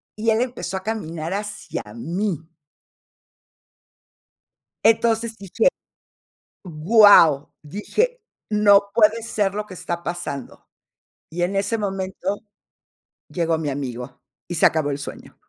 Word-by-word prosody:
y 220 +1 0
él 220 +2 +2
empezó 240 -7 -3
a 190 - -7
caminar 170 -6 -4
hacia 205 +1 -5
mí. 170 - -2 2.5
Entonces, 225 0 +2
dije: 200 - 0 1.0
"¡Guau!", 170 -3 +5
dije: 430 - -2 0.3
"No 205 -1 +5
puede 225 0 +4
ser 205 -4 -1
lo 210 0 -3
que 185 - -10
está 170 0 -4
pasando". 170 -6 -6 0.6
Y 175 +2 -2
en 195 +3 -1
ese 200 +4 0
momento, 195 0 -3 0.8
llegó 165 -2 0
mi 155 -2 -2
amigo, 130 -2 -6 0.3
y 175 - -4
se - - +3
acabó 155 -3 0
el 140 - -2
sueño. - - -9
195 Hz, 115 wpm, -22 LUFS, 165-215 Hz, 2.5 s, Guau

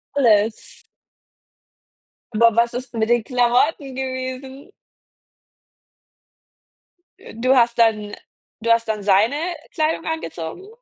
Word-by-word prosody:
Alles. 220 -5 +1 1.5
Aber 230 0 +4
was 235 +1 +2
ist 250 0 -6
mit 225 0 -1
den 240 -2 +3
Klamotten 255 +3 +1
gewesen? 260 +2 -6 2.7
Du 255 +3 +2
hast 235 -1 +3
dann 215 -3 +1 0.5
du 230 +1 +1
hast 230 -1 +2
dann 215 -2 -3
seine 205 +7 +3 0.4
Kleidung 320 0 -1
angezogen? 320 - -5
235 Hz, 95 wpm, -21 LUFS, 220-265 Hz, 2.7 s, Aber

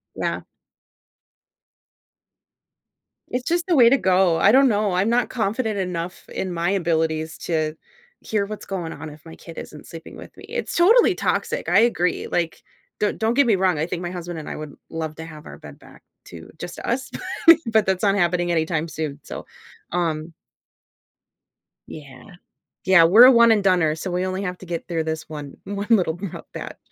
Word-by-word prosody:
Yeah. - - -2 2.9
It's 250 0 -3
just 345 +1 0
the 350 - +2
way 240 -4 +7
to 275 - +4
go, 185 -5 +3
I - - +5
don't 270 0 +6
know, 205 -3 +1
I'm 190 +4 +1
not 240 0 +1
confident 220 -1 -1
enough 180 -2 -4
in 185 -2 -4
my 170 +1 -1
abilities 160 -4 -1
to 155 -2 -2 0.5
hear 210 -2 -1
what's 210 +1 -8
going 175 -4 -4
on 160 - -8
if 150 +1 -15
my 160 - -11
kid 165 - -13
isn't 150 - -9
sleeping 165 0 -11
with - - -12
me, - - -12
it's 475 +2 -4
totally 435 +8 +5
toxic, - - -2
I - - +4
agree, 180 -7 +1
like, 170 -2 -2 0.4
don't 210 - 0
don't 225 +1 +1
get 280 +3 +4
me 225 -4 +3
wrong, 185 -3 +2
I 155 - 0
think 175 0 -4
my 175 -1 -4
husband 175 -2 -6
and 155 - -8
I - - -5
would 150 -2 -8
love 160 -1 -5
to 160 - -8
have 155 -2 -11
our - - -10
bed - - -12
back - - -18 0.2
to 80 -1 -12
just 175 +2 -7
us, 255 +2 -3 0.4
but 335 - +11
but 220 -2 +3
that's 190 0 -1
not 200 -1 +3
happening 175 -2 +1
anytime 160 -1 0
soon, 155 -3 -5
so, - - -8 0.5
um 165 -2 -2 1.5
Yeah. 140 -4 -11 0.6
Yeah, 190 -3 +7
we're 205 +9 +8
a 260 - +9
one 235 -2 +6
and 210 -2 +3
doner, 180 -5 +3
so 175 +4 -5
we 180 +1 -1
only 185 +1 -3
have 180 -2 -4
to - - -11
get 170 -1 -5
through 165 -2 -1
this 160 0 -4
one 150 -3 -8
one 200 0 -4
little 185 -8 +3
rough 185 0 -7
patch. - - -7
180 Hz, 190 wpm, -22 LUFS, 160-210 Hz, 2.9 s, but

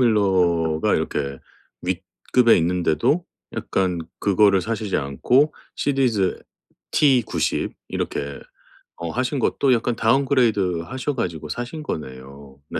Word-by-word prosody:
밀러가 90 -8 +2
이렇게 70 -1 -2 0.4
윗급에 120 -2 +2
있는데도 90 - +1 0.3
약간 90 -3 -1 0.2
그거를 100 -1 +4
사시지 110 -2 -2
않고 125 - +2 0.2
시디즈 125 -9 +1 0.5
T90 130 -6 +2 0.2
이렇게 70 0 -4 0.6
어 85 -1 -4
하신 130 - -1
것도 130 +1 +2
약간 120 0 0
다운그레이드하셔 120 - +1
가지고 85 - -3
사신 120 - -5
거네요. 70 - -8
네. - - -3
100 Hz, 255 characters per minute, -22 LUFS, 80-125 Hz, 0.6 s, 그거를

